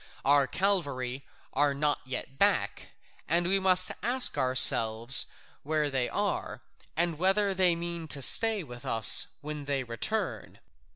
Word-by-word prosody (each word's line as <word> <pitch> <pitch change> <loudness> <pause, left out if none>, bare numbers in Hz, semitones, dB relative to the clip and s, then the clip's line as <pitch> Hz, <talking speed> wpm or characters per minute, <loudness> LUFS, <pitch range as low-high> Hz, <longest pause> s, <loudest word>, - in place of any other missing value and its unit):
Our 140 -1 +2
cavalry 140 -7 -3 0.3
are 140 +1 0
not 145 +1 -1
yet 130 +1 -7
back, - - -1 0.3
and 170 +2 0
we 195 +2 0
must 185 -1 +2
ask 250 +3 +4
ourselves 120 0 +4 0.3
where 150 0 -3
they 130 -2 -2
are - - -5 0.3
and 170 -2 -1
whether 195 +2 0
they 185 -2 +1
mean 170 -1 -7
to 140 -2 -3
stay 225 - +4
with 120 -3 -13
us 115 -6 +4
when 150 -1 -8
they 140 -2 -3
return. 120 - -5
145 Hz, 135 wpm, -27 LUFS, 130-185 Hz, 0.3 s, ask